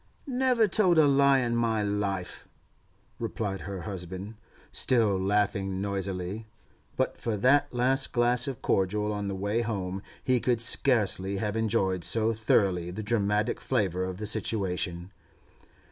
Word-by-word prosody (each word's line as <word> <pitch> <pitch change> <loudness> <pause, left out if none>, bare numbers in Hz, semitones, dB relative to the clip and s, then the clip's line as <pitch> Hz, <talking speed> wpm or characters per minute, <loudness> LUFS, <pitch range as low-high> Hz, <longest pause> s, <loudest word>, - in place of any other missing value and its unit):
'Never 255 -4 +2
told 185 -4 +3
a 155 - +7
lie 140 -1 +4
in 120 -1 -1
my 115 -2 +1
life,' 100 -3 -3 0.7
replied 100 -3 -3
her 95 -2 -6
husband, 95 +2 -6 0.4
still 115 -6 +2
laughing 95 0 0
noisily. 100 +1 -3 0.5
But - - -1
for 115 -3 -2
that 140 +6 +3
last 130 +2 0
glass 120 +1 +2
of 135 -4 -6
cordial 105 +2 0
on 105 -1 -3
the 100 - -3
way 100 +4 -1
home 95 -4 -3 0.2
he 130 -1 +2
could 120 -1 0
scarcely 105 -5 +1
have 105 +1 -2
enjoyed 95 -5 0
so 110 +7 +2
thoroughly 95 -5 +1
the 100 +5 -6
dramatic 105 0 0
flavour 95 -8 0
of 95 -1 -4
the 105 - -5
situation. 95 -4 -1
105 Hz, 140 wpm, -28 LUFS, 95-120 Hz, 0.7 s, a